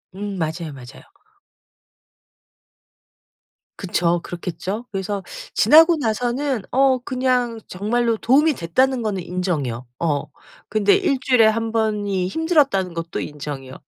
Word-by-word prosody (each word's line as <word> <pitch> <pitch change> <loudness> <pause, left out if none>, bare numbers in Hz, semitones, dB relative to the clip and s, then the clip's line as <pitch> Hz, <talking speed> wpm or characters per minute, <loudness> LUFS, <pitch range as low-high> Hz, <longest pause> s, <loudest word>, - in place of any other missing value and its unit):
음. 200 0 -5
맞아요, 160 -1 -3
맞아요. 130 -1 -12 2.7
그쵸. 175 -2 0
그렇겠죠? 185 +6 -5
그래서 195 0 -3 0.3
지나고 325 +2 +6
나서는 245 0 -1
어 265 0 +4
그냥 250 -3 -1
정말로 225 +4 0
도움이 290 +8 +3
됐다는 255 +9 +1
거는 200 -4 -2
인정이요. 160 -10 -3
어. 150 -4 0 0.4
근데 205 -2 +3
일주일에 255 -4 +3
1 225 +1 +1
번이 205 -4 0
힘들었다는 275 - +1
것도 165 0 -4
인정이요. 140 -3 -7
210 Hz, 260 characters per minute, -21 LUFS, 175-250 Hz, 2.7 s, 지나고